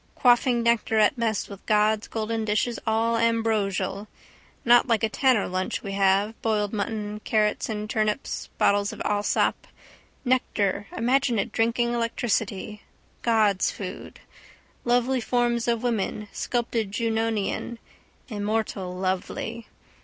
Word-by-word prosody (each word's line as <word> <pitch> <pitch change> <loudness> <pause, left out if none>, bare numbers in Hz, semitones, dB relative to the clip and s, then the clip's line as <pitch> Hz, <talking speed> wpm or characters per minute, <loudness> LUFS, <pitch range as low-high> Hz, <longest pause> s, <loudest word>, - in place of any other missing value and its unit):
Quaffing 245 -1 +3
nectar 230 -1 +2
at 215 +5 +4
mess 230 -3 -1
with 200 -1 -11
gods 215 0 +2
golden 225 0 -2
dishes, 215 +2 0
all 225 +1 +2
ambrosial. 220 -3 0 0.6
Not 240 +1 +6
like 230 -2 +1
a 220 - +3
tanner 255 -2 +2
lunch 185 +1 -2
we 200 - -5
have, 195 +2 +2
boiled 210 -2 0
mutton, 210 0 -3
carrots 215 0 +1
and 210 -1 -3
turnips, 215 +3 -2
bottle 205 0 +4
of 205 +2 -5
Allsop. 205 0 0 0.6
Nectar 210 -6 0
imagine 250 +1 +2
it 195 - -1
drinking 235 +1 +1
electricity: 225 -3 -2 0.4
gods' 215 -5 +3
food. 185 -2 -7 0.7
Lovely 245 +1 +2
forms 240 0 0
of 235 0 0
women 215 -3 -1
sculped 240 -1 -2
Junonian. 225 +1 -1 0.5
Immortal 205 -4 -2
lovely. 190 +5 -3
220 Hz, 120 wpm, -25 LUFS, 205-235 Hz, 0.7 s, Not